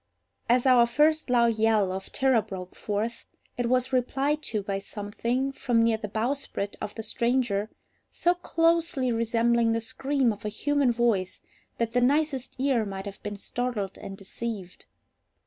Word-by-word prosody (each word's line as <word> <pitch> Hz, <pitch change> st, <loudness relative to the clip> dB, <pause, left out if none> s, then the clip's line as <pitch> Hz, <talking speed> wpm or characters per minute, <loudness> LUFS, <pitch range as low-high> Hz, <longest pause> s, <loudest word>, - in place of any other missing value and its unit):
As 245 Hz, +1 st, +4 dB
our 245 Hz, -2 st, +6 dB
first 300 Hz, +4 st, +2 dB
loud 235 Hz, -2 st, +3 dB
yell 215 Hz, -4 st, +3 dB
of 190 Hz, +1 st, -6 dB
terror 265 Hz, -4 st, +3 dB
broke 185 Hz, -3 st, -8 dB
forth, 220 Hz, +3 st, -3 dB, 0.3 s
it 245 Hz, -1 st, -1 dB
was 255 Hz, +1 st, +1 dB
replied 275 Hz, +4 st, +1 dB
to 210 Hz, -3 st, -1 dB
by 195 Hz, 0 st, -2 dB
something, 230 Hz, +7 st, -2 dB
from 240 Hz, -4 st, +1 dB
near 230 Hz, -1 st, +3 dB
the 215 Hz, -1 st, -5 dB
bowsprit 225 Hz, -2 st, -2 dB
of 210 Hz, -, -5 dB
the 225 Hz, -, -5 dB
stranger, 235 Hz, -2 st, 0 dB, 0.4 s
so 350 Hz, -, +2 dB
closely 330 Hz, -6 st, +1 dB
resembling 230 Hz, 0 st, +2 dB
the 230 Hz, -, +1 dB
scream 260 Hz, 0 st, 0 dB
of 205 Hz, -, -13 dB
a 210 Hz, -, -2 dB
human 285 Hz, +4 st, +1 dB
voice 230 Hz, -6 st, 0 dB, 0.4 s
that 230 Hz, -1 st, -1 dB
the 245 Hz, -, +3 dB
nicest 280 Hz, 0 st, +1 dB
ear 260 Hz, -4 st, +2 dB
might 195 Hz, -1 st, -5 dB
have 200 Hz, -1 st, -8 dB
been 205 Hz, -1 st, -5 dB
startled 220 Hz, -3 st, -3 dB
and 195 Hz, -, -8 dB
deceived. 195 Hz, -1 st, -6 dB
235 Hz, 160 wpm, -27 LUFS, 210-260 Hz, 0.4 s, our